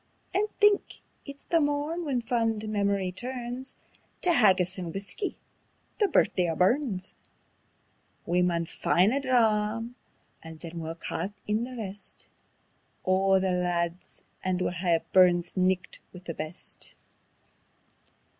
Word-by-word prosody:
And 415 +3 +1
think! 415 -1 +3 0.2
it's 280 -1 -10
the 335 -1 +3
morn 295 +4 0
when 255 -5 -1
fond 225 -3 0
memory 200 -3 0
turns 250 +4 -5 0.5
Tae 360 - +4
haggis 190 - +4
and 175 -2 -4
whuskey 200 - -3 0.6
the 415 - +4
Birthday 180 - +2
o' 165 - -1
Burns. 195 - +1 1.1
We 175 +1 +2
maun 170 -2 +1
find 185 +6 +2
a 275 - +2
dram; 230 -3 +1 0.5
then 165 +1 -8
we'll 165 0 -4
ca' 165 +1 -3 0.2
in 215 +3 0
the 255 0 -8
rest 205 -2 -6 0.8
O' 190 +1 +4
the 190 0 +1
lads, 175 -1 -2 0.2
and 185 -1 0
we'll 180 - 0
hae 175 -1 +1
a 165 - -2
Burns' 175 -2 +4
Nicht 185 0 0
wi' 180 - -11
the 165 - -4
best." 155 +3 -6
195 Hz, 130 wpm, -28 LUFS, 180-245 Hz, 1.1 s, Tae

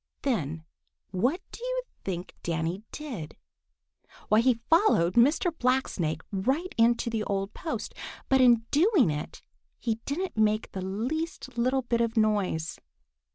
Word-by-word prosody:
Then 165 - -1 0.5
what 250 - +1
do 470 - -10
you - - -1 0.2
think 180 -2 -4
Danny 165 +3 -2
did? 235 - -7 0.9
Why, 215 - +5
he 250 +1 +4
followed 320 - +4
Mr. 300 +8 +3
Blacksnake 225 - 0
right 265 - -1
into 235 0 +3
the 220 -2 -1
old 195 +1 -2
post, 325 - -4 0.3
but 265 -1 +4
in 240 -3 +5
doing 315 - +4
it 150 0 -6 0.3
he 225 -2 -2
didn't 360 +7 -2
make 215 0 +1
the 190 - -5
least 255 - -3
little 255 +2 +1
bit 235 -1 0
of 230 0 -1
noise. 205 -7 +1
235 Hz, 135 wpm, -28 LUFS, 190-275 Hz, 0.9 s, Why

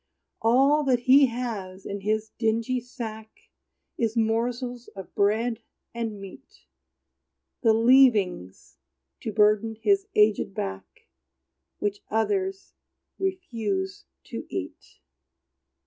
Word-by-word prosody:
All 270 +6 +4
that 250 -3 +2
he 270 +2 +6
has 215 -6 -5
in 200 0 -5
his 215 +1 -1
dingy 230 +3 +1
sack 225 -3 -7 0.7
Is 230 0 0
morsels 240 +2 -1
of 195 -2 -9
bread 220 +3 +1 0.3
and 225 -3 -4
meat, 195 - -13 1.0
The 225 - +5
leavings, 220 - +3 0.4
to 220 - -4
burden 215 +1 +3
his 395 - +1
aged 210 -2 +3
back, 95 -1 -6 0.7
Which 205 0 -2
others 385 - -1 0.5
refused 225 - -3 0.2
to - - -7
eat. - - -7
225 Hz, 100 wpm, -26 LUFS, 210-250 Hz, 1.0 s, he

